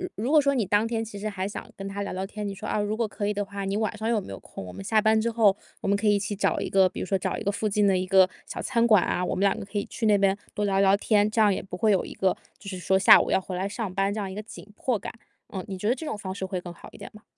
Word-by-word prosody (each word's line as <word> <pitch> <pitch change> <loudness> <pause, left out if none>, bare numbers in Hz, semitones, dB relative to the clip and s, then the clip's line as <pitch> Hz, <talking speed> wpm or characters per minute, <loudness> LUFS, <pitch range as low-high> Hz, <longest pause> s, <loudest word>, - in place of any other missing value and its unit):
如 245 +8 -2
如 - - +6
果 300 - +7
说 280 0 +1
你 235 -5 +1
当 205 +4 +2
天 225 -1 -2
其 205 -2 -8
实 215 - -3
还 195 -2 -3
想 205 - -6
跟 195 0 -6
他 200 +1 -5
聊 200 - -4
聊 190 +1 -3
天， 210 +1 -6
你 195 - -5
说： - - -9
“啊， - - 0
如 210 +1 -1
果 230 -2 0
可 205 0 -4
以 210 - 0
的 205 0 -2
话， 200 0 -6
你 195 +1 -1
晚 215 0 -1
上 220 +1 -3
有 225 -2 +2
没 - - -9
有 - - -8
空？ - - -9
我 90 - -9
们 95 +1 -8
下 215 - +2
班 220 +1 +3
之 235 - 0
后， 220 -4 +4 0.3
我 - - -4
们 200 - +3
可 210 +1 0
以 205 - +5
一 200 - +1
起 205 +1 -3
找 195 - 0
一 - - -3
个 190 -1 +4
比 - - -8
如 - - -3
说 195 - 0
找 190 - -1
一 - - -5
个 200 - +1
附 215 +1 -2
近 205 +1 +2
的 195 -1 +4
一 185 0 -1
个 190 -1 +6 0.2
小 - - -6
餐 235 -2 +2
馆 210 -5 +5
啊， 180 - -1
我 - - -1
们 - - -2
2 200 -1 +3
个 - - -6
可 205 +1 -6
以 200 - -1
去 225 - -2
那 210 - +5
边 195 0 +3 0.2
多 210 - 0
聊 195 -1 +1
聊 195 0 +5
天， 210 -1 +2
这 220 - -2
样 210 -2 +5
也 - - -3
不 180 -2 -8
会 215 +3 +3
有 190 - +2
一 - - -8
个 190 -1 +1 0.2
就 200 - -14
是 185 -2 -5
说 190 +1 +2
下 190 - +8
午 - - -3
要 - - +3
回 185 -1 -6
来 190 +2 -2
上 210 -3 -4
班 195 +1 +1
这 215 - -3
样 195 -2 -4
一 - - -7
个 210 - -5
紧 215 - -12
迫 245 -1 0
感。” - - -7 0.4
嗯， 190 -2 -4
你 190 - -5
觉 205 +3 -3
得 240 - +4
这 265 - -8
种 215 - -3
方 190 -2 -5
式 190 -1 -5
会 185 -1 -3
更 175 -1 -8
好 - - -13
一 - - -12
点 - - -10
吗？ 215 0 -15
200 Hz, 390 characters per minute, -26 LUFS, 190-215 Hz, 0.4 s, 下